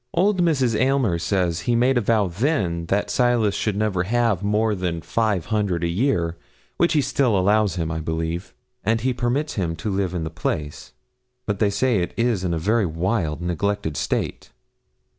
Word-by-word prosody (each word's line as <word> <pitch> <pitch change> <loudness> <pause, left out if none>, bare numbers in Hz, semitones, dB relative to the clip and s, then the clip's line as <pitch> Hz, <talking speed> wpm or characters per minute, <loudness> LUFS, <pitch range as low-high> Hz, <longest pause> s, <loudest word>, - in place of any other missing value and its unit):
Old 190 +2 +3
Mrs. 135 -9 +2
Aylmer 130 -8 +2
says 90 -2 0
he 120 +7 0
made 125 +3 +3
a 120 - +3
vow 110 -1 +2
then 90 - -1
that 100 +3 0
Silas 120 -4 +2
should 105 -1 -1
never 105 -4 0
have 115 -3 +1
more 105 +2 +1
than 90 -4 -3
five 105 -7 0
hundred 100 -6 0
a - - +2
year, 85 -4 0 0.4
which 170 0 +3
he 150 - +3
still 125 -5 +1
allows 105 +2 +2
him, 85 -2 -2
I 80 - -2
believe, 80 +2 -3 0.3
and 115 +1 +1
he 130 +2 +1
permits 125 +5 -1
him 85 -5 -2
to 85 +6 -4
live 95 -2 -1
in 85 - -2
the 80 - -4
place. 75 -3 -4 0.5
But 105 -2 -2
they 105 - +3
say 110 +2 +1
it 85 - -3
is 115 -5 +1
in 90 - -1
a 85 - 0
very 105 +5 +1
wild, 85 -1 -1
neglected 85 -1 -1
state.' - - -2
100 Hz, 185 wpm, -23 LUFS, 85-120 Hz, 0.5 s, Old